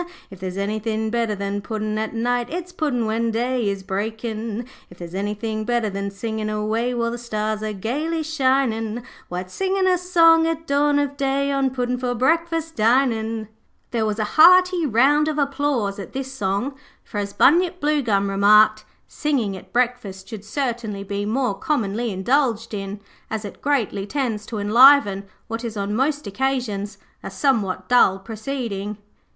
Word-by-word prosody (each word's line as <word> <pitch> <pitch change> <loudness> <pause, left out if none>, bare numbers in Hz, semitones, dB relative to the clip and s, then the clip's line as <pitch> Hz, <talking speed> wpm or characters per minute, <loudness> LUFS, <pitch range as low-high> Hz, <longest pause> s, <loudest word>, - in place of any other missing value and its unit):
If 190 - -11
there's 185 0 -5
anythin' 215 +2 -2
better 230 -2 0
than 200 0 -3
puddin' 215 0 -3
at 220 +1 -3
night, 245 +1 0
It's 355 +2 -5
puddin' 290 -9 -1
when 225 +1 0
day 240 0 0
is 195 -1 -4
breakin'. 220 +3 -4 0.2
'If 175 - -15
there's 175 -1 -9
anythin' 210 +3 -3
better 235 -2 0
than 200 +1 -3
singin' 215 +2 -4
away 220 +3 -1
While 235 -1 0
the 240 - -5
stars 215 -2 -2
are 215 0 -2
gaily 295 - -2
shinin', 260 -6 0 0.3
Why, 180 +1 -3
it's 185 0 -12
singin' 385 0 0
a 365 -1 +3
song 330 -2 +5
at 325 0 -2
dawn 290 0 +2
of 285 -1 -1
day, 275 +1 0
On 275 -1 +1
puddin' 250 -1 -2
for 250 -1 -1
breakfast 325 +5 0
dinin'.' 225 -2 +1 0.4
There 230 -2 0
was 215 -1 -1
a 215 - 0 0.2
hearty 365 -1 +6
round 280 +6 +4
of 310 -1 -1
applause 275 -8 0
at 195 - -8
this 265 0 -4
song, 205 +4 -1 0.3
for 205 - -5
as 200 0 -3
Bunyip 350 - +3
Bluegum 245 - +1
remarked, 210 +2 +5 0.2
'Singing 255 -10 -1
at 185 - -12
breakfast 235 -6 -1
should 210 -1 -8
certainly 230 -4 -3
be 200 +1 -3
more 250 0 0
commonly 230 -1 -1
indulged 230 +3 0
in, 200 0 -5 0.3
as 220 -1 -4
it 205 - -9
greatly 230 -8 0
tends 225 -5 -2
to 225 - -5
enliven 210 -1 +5 0.2
what 225 +1 -4
is 225 -2 -5
on 200 +1 -2
most 285 +3 0
occasions 210 -2 -2 0.2
a - - -6
somewhat 200 -9 0
dull 245 -6 +5
proceeding.' 215 -1 -5
230 Hz, 165 wpm, -22 LUFS, 205-275 Hz, 0.4 s, hearty